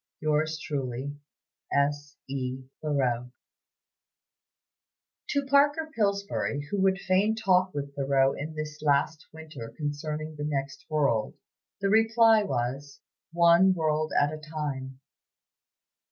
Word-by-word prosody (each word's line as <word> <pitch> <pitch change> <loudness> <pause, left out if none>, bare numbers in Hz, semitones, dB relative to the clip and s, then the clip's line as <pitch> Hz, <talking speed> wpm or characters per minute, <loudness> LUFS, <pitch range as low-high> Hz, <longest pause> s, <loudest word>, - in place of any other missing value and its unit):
"Yours 155 +1 0
truly, 135 -2 -4 0.6
"S. 145 0 0
E. 130 -1 -4 0.2
THOREAU." 125 -5 0 2.0
To 280 -5 0
Parker 290 +3 +3
Pillsbury, 200 -8 -1
who 200 - 0
would 190 0 +3
fain 195 +3 +2
talk 190 -4 +2
with 140 -1 -4
Thoreau 135 -1 +2
in 155 +2 -6
this 155 0 -6
last 150 +1 +1
winter 150 -8 -9
concerning 150 +1 -4
the 145 - -4
next 135 -2 -3
world, 140 -8 +1 0.5
the 200 - +1
reply 225 +1 +5
was, 140 -4 -3 0.3
"One 170 +2 +5
world 155 -1 0
at 145 +1 +2
a 155 - -6
time." 145 -4 -5
155 Hz, 110 wpm, -28 LUFS, 140-185 Hz, 2.0 s, reply